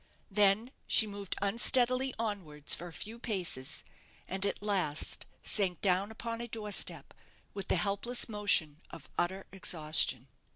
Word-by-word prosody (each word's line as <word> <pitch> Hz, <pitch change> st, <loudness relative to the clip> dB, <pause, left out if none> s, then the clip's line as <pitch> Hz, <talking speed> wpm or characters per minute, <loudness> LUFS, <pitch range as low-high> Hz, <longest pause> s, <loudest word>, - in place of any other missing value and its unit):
Then 205 Hz, +4 st, +3 dB, 0.2 s
she 220 Hz, -, +6 dB
moved 200 Hz, -2 st, -6 dB
unsteadily 250 Hz, +5 st, +3 dB
onwards 180 Hz, -10 st, -1 dB
for 175 Hz, -, -5 dB
a -, -, -10 dB
few 220 Hz, +7 st, -8 dB
paces, 180 Hz, -, -1 dB, 0.4 s
and 190 Hz, +1 st, -1 dB
at 200 Hz, -, -4 dB
last 185 Hz, -8 st, 0 dB, 0.2 s
sank 185 Hz, -5 st, +2 dB
down 190 Hz, +1 st, +1 dB
upon 230 Hz, +1 st, -6 dB
a 235 Hz, -, -5 dB
door 215 Hz, -2 st, -5 dB
step, -, -, 0 dB, 0.4 s
with 195 Hz, -, -6 dB
the -, -, +2 dB
helpless 200 Hz, +7 st, +2 dB
motion 200 Hz, -8 st, +2 dB
of -, -, -11 dB
utter 190 Hz, +2 st, -1 dB
exhaustion. 155 Hz, -8 st, 0 dB
200 Hz, 140 wpm, -31 LUFS, 175-220 Hz, 0.4 s, she